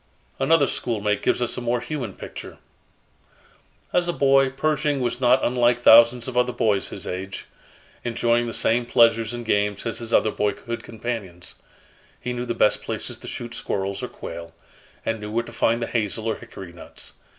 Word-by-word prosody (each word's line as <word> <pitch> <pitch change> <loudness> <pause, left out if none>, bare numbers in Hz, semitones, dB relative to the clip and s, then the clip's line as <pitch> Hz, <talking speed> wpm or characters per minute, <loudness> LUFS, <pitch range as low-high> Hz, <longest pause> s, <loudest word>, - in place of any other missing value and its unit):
'" - - -37
Another 145 +2 +4
schoolmate 105 -6 -1
gives 125 - +1
us 120 - -2
a - - -3
more 120 0 0
human 140 +1 -4
picture: - - -9 1.4
"As 175 -1 +2
a - - +2
boy, 135 -2 +4
Pershing 145 +1 0
was 120 0 -2
not 125 +1 +4
unlike 120 0 +2
thousands 115 +1 +7
of 130 - -5
other 125 0 +3
boys 105 -5 +1
of - - -6
his - - -7
age, 95 +2 -5 0.6
enjoying 120 0 +1
the - - -3
same 120 +1 +1
pleasures 115 -2 +4
and 120 -1 -6
games 105 -1 0
as 115 - -3
his 115 -1 -5
other 110 - +4
boyhood 115 +3 -2
companions. 110 -7 -6 0.6
He 125 - -3
knew 125 0 -4
the 120 - -2
best 105 - +3
places - - -5
to - - -10
shoot 120 -1 -6
squirrels 95 -2 -2
or - - -3
quail, 85 0 -8 0.5
and 115 0 -1
knew 105 0 -6
where 115 +2 0
to 120 - -11
find 115 +1 +1
the - - 0
hazel 110 -1 -2
or 110 - 0
hickory 90 -3 -10
nuts. 85 - -10
115 Hz, 185 wpm, -24 LUFS, 105-125 Hz, 1.4 s, thousands